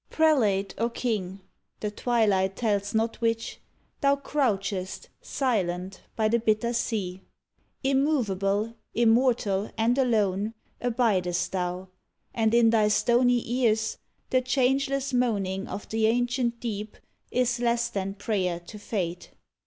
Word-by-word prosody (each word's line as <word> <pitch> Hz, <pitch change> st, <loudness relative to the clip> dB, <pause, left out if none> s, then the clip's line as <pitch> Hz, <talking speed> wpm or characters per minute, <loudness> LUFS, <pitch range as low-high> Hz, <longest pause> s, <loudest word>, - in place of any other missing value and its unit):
Prelate 220 Hz, -12 st, +2 dB
or 230 Hz, +1 st, +1 dB
king 200 Hz, -6 st, -3 dB, 0.4 s
(the 210 Hz, -, -3 dB
twilight 205 Hz, -5 st, +1 dB
tells 205 Hz, -2 st, -1 dB
not 225 Hz, +2 st, 0 dB
which), 230 Hz, -1 st, -1 dB, 0.4 s
Thou 280 Hz, -1 st, +3 dB
crouchest, 205 Hz, -10 st, -2 dB
silent, 190 Hz, -7 st, -2 dB
by 220 Hz, -1 st, +2 dB
the 235 Hz, +2 st, +2 dB
bitter 225 Hz, +1 st, +1 dB
sea. 195 Hz, -6 st, -2 dB, 0.6 s
Immovable, 230 Hz, -7 st, +1 dB, 0.2 s
immortal 225 Hz, -4 st, +2 dB
and 230 Hz, +2 st, +2 dB
alone, 215 Hz, -4 st, +1 dB, 0.3 s
Abidest 215 Hz, -8 st, +1 dB
thou, 180 Hz, 0 st, -3 dB, 0.4 s
and 225 Hz, 0 st, +2 dB
in 230 Hz, -1 st, +5 dB
thy 215 Hz, -2 st, +4 dB
stony 240 Hz, +3 st, +3 dB
ears 225 Hz, -3 st, +1 dB, 0.3 s
The 255 Hz, -, +3 dB
changeless 270 Hz, +1 st, +1 dB
moaning 200 Hz, -6 st, 0 dB
of 205 Hz, -, -6 dB
the 220 Hz, 0 st, +2 dB
ancient 240 Hz, 0 st, 0 dB
deep 215 Hz, -2 st, -5 dB, 0.3 s
Is 245 Hz, -1 st, +1 dB
less 235 Hz, 0 st, +1 dB
than 195 Hz, -2 st, -3 dB
prayer 190 Hz, -4 st, -1 dB
to 190 Hz, +5 st, -11 dB
Fate. 180 Hz, -5 st, -4 dB
225 Hz, 120 wpm, -27 LUFS, 195-245 Hz, 0.6 s, in